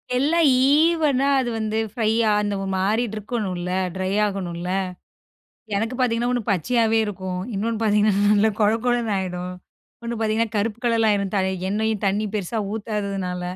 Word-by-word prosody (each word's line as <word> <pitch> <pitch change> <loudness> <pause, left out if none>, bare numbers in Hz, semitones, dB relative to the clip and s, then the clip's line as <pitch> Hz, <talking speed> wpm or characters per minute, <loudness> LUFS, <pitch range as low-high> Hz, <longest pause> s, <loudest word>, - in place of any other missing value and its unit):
எல்லாம் 310 +6 +3 0.2
ஈவனா 295 -3 +3
அது 245 -2 -1
வந்து 220 0 -2 0.2
ஃப்ரையா 225 -1 +1
அந்த 205 -1 -1
ஒரு 195 - -3
மாறிட்டு 215 +4 0
இருக்கணும்ல 195 -5 -3 0.2
ட்ரை 185 0 -2 0.2
ஆகணும்ல? 180 -3 -4 1.1
எனக்கு 225 +5 -1
பாத்தீங்கன்னா, 240 -1 +1
ஒண்ணு 245 -1 0
பச்சையாகவே 225 +4 +2
இருக்கும். 190 -3 -4
இன்னொன்னு 225 +3 -2
பாத்தீங்கன்னா 210 -1 +3 0.2
நல்ல 210 +1 +4
கொழ 210 -1 +4
கொழன்னு 240 -3 +1
ஆகிடும். 180 -1 -4 0.5
ஒண்ணு 235 -1 -4
பாத்தீங்கன்னா, 220 0 0
கருப்பு 220 +2 -1
கலர்லாம் 225 -2 +3
ஆயிடும். 200 -1 -1 0.4
எண்ணெயும் 215 0 -1
தண்ணீ 205 +2 +1
பெருசா 210 +3 -2
ஊத்தாதுனால. 200 -4 -3
215 Hz, 135 wpm, -23 LUFS, 195-230 Hz, 1.1 s, நல்ல